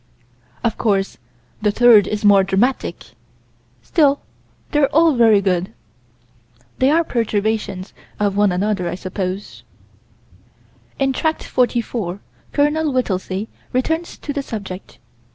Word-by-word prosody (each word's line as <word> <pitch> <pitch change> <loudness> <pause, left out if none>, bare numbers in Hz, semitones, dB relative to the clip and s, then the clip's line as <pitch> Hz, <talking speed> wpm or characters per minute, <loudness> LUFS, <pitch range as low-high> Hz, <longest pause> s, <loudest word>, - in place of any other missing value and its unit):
Of 230 - -1
course 195 -3 0 0.4
the 210 - +2
third 215 -2 +6
is 210 0 -3
more 200 -1 +6
dramatic 195 +7 -1 0.7
still 285 -4 +2 0.5
they're 295 -2 +3
all 325 0 +4
very 225 -5 +5
good. 185 +2 0 1.1
They 260 - +4
are 330 +3 +3
perturbations 215 - -2 0.3
of 205 -1 +1
one 205 -1 +3
another, 185 -1 -1
I - - -3
suppose. 185 +1 -5 1.4
In 270 -1 +1
Tract 315 +4 -1
44, 235 -6 -1 0.3
Col. 295 +1 +1
Whittelsey 195 -5 -2 0.3
returns 320 +7 -1
to 285 - -5
the 280 - -2
subject. 200 -7 -7
215 Hz, 115 wpm, -19 LUFS, 195-270 Hz, 1.4 s, third